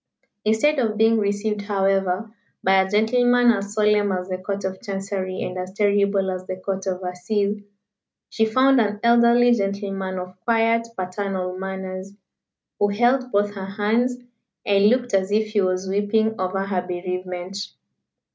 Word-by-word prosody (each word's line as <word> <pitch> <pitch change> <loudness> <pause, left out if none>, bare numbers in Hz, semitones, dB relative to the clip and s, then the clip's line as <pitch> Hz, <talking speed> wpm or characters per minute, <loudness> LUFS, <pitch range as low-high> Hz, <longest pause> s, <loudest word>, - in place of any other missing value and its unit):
Instead 220 +8 +2
of 220 -4 0
being 225 +1 +4
received, 205 +1 -1
however, 195 0 0 0.3
by 190 0 +5
a 190 - -2
gentleman 245 +3 +4
as 200 -2 -2
solemn 210 -1 +3
as 180 -1 -3
the 185 0 -3
Court 200 +2 -4
of 190 0 -4
Chancery 195 -1 -4
and 180 0 -4
as 185 +1 -6
terrible 200 -1 +2
as 185 0 -5
the 185 - -3
Court 190 +1 -4
of 185 0 -3
Assize, 200 +3 -2 0.7
she 220 - +1
found 260 +3 +4
an 210 -1 -1
elderly 235 +1 +5
gentleman, 195 -3 -2
of 185 0 -7
quiet, 230 0 +2
paternal 185 0 -3
manners, 190 0 -6 0.7
who 205 - +3
held 245 +5 +1
both 205 0 +1
her 195 -1 -6
hands, 220 +5 0 0.5
and 200 0 +4
looked 245 +1 +1
as 190 0 +1
if 215 +1 +1
he 215 -1 +1
was 185 0 -1
weeping 205 +3 +1
over 195 +1 -1
her 190 -2 -1
bereavement. 180 +1 -5
200 Hz, 155 wpm, -22 LUFS, 190-220 Hz, 0.7 s, by